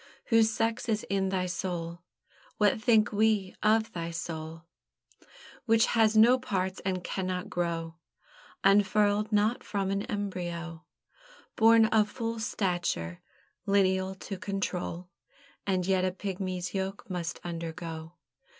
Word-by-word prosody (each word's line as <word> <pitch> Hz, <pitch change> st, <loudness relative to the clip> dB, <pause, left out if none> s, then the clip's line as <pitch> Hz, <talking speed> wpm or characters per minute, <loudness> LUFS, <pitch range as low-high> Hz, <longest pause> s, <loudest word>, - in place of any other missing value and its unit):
"Whose 225 Hz, -2 st, +5 dB
sex 230 Hz, +1 st, -1 dB
is 215 Hz, -1 st, 0 dB
in 195 Hz, -1 st, +1 dB
thy 185 Hz, -1 st, 0 dB
soul!" 175 Hz, -1 st, -4 dB, 0.6 s
What 210 Hz, +1 st, +3 dB
think 220 Hz, -3 st, +4 dB
we 210 Hz, -2 st, +1 dB
of 220 Hz, +1 st, +2 dB
thy 170 Hz, -1 st, -4 dB
soul? 165 Hz, -1 st, -6 dB, 1.0 s
Which 225 Hz, 0 st, +5 dB
has 220 Hz, -2 st, +4 dB
no 240 Hz, +4 st, +7 dB
parts, 190 Hz, -7 st, -2 dB
and 185 Hz, -2 st, -2 dB
cannot 185 Hz, +1 st, -3 dB
grow, 165 Hz, -2 st, -2 dB, 0.7 s
Unfurled 205 Hz, +1 st, +3 dB
not 210 Hz, +3 st, +2 dB
from 195 Hz, -2 st, -2 dB
an 195 Hz, 0 st, 0 dB
embryo; 175 Hz, -6 st, -4 dB, 0.7 s
Born 225 Hz, 0 st, +6 dB
of 215 Hz, -1 st, +3 dB
full 230 Hz, 0 st, -4 dB
stature, 175 Hz, -, -2 dB, 0.5 s
lineal 190 Hz, -1 st, +2 dB
to 190 Hz, 0 st, -7 dB
control; 185 Hz, -3 st, -3 dB, 0.6 s
And 185 Hz, -2 st, +1 dB
yet 190 Hz, -1 st, +2 dB
a 185 Hz, -, +1 dB
pigmy's 185 Hz, -1 st, -4 dB
yoke 195 Hz, 0 st, -3 dB
must 175 Hz, -2 st, -4 dB
undergo. 165 Hz, -1 st, -6 dB
190 Hz, 125 wpm, -29 LUFS, 175-215 Hz, 1.0 s, no